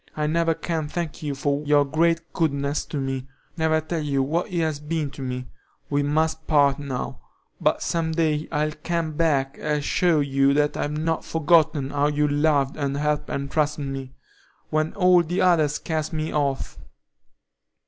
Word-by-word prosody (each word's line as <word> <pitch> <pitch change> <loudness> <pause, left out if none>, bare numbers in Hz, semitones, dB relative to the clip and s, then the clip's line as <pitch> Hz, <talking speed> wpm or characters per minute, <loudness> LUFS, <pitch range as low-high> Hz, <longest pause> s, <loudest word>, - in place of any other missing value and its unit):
I 150 - 0
never 165 +1 +1
can 160 -3 -3
thank 165 0 -4
you 145 -2 -3
for 140 +1 -1
your 145 -1 +4
great 165 +3 0
goodness 140 -3 0
to - - -5
me, 135 -1 -3 0.3
never 160 -1 +2
tell 160 +1 -3
you 140 -2 0
what 165 +7 -1
it 175 - -1
has 155 -3 -1
been 150 -1 -2
to 135 - -10
me. 125 -1 -4 0.5
We 145 0 +2
must 160 +2 0
part 145 -2 +4
now; 135 -3 -5 0.4
but - - +1
some 165 -1 -1
day 155 -2 0
I'll 150 +1 0
come 170 -2 -1
back 145 -4 +1
and 150 -1 -1
show 170 +1 +2
you 140 -1 +2
that 150 0 +2
I've 150 +1 -2
not 160 +1 -1
forgotten 155 -3 +2
how 145 0 +2
you 150 0 +1
loved 145 -2 +1
and 140 -2 -1
helped 150 0 -1
and 140 0 -3
trusted 150 -1 0
me, 135 -1 -6 0.6
when 155 +1 0
all 180 -2 +5
the 175 +2 -1
others 155 -5 +3
cast 155 -1 -3
me 155 0 -2
off." 140 -3 -1
150 Hz, 175 wpm, -24 LUFS, 140-160 Hz, 0.6 s, all